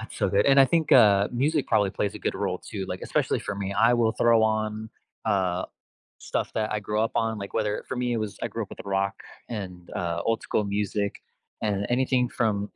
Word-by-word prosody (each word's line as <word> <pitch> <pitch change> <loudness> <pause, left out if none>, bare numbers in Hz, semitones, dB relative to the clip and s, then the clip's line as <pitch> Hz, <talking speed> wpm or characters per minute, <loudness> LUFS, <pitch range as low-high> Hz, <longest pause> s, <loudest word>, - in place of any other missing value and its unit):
that's 110 - -9
so 100 - +1
good, 100 +2 +2
and 140 0 +6
I - - +9
think, 160 +3 +1
uh, 100 -4 +6
music 145 +6 +1
probably 105 -3 +2
plays 100 +2 -2
a - - -6
good - - -2
role 95 -2 -2
too, 100 -4 -6
like, 90 - -4
especially - - 0
for 105 - -4
me, 100 0 -3
I 115 +4 +4
will 115 -2 +2
throw 115 -2 +4
on, 110 0 -1 0.3
uh, 95 -4 +1 0.5
stuff - - -3
that 110 -1 -1
I 105 - -1
grew 105 +1 -1
up 115 - 0
on, 115 -2 0
like, 100 0 -7
whether 105 -2 -1
for - - -3
me, 125 0 0
it - - 0
was 110 -2 -4
I - - -1
grew - - -4
up - - -8
with - - -10
rock 100 0 0 0.3
and, 90 -6 -7
uh, 85 -2 -2
old-school 115 -1 0
music 100 0 -2 0.4
and 100 -1 0
anything 125 0 +2
from 105 -5 -1
105 Hz, 220 wpm, -26 LUFS, 100-115 Hz, 0.5 s, I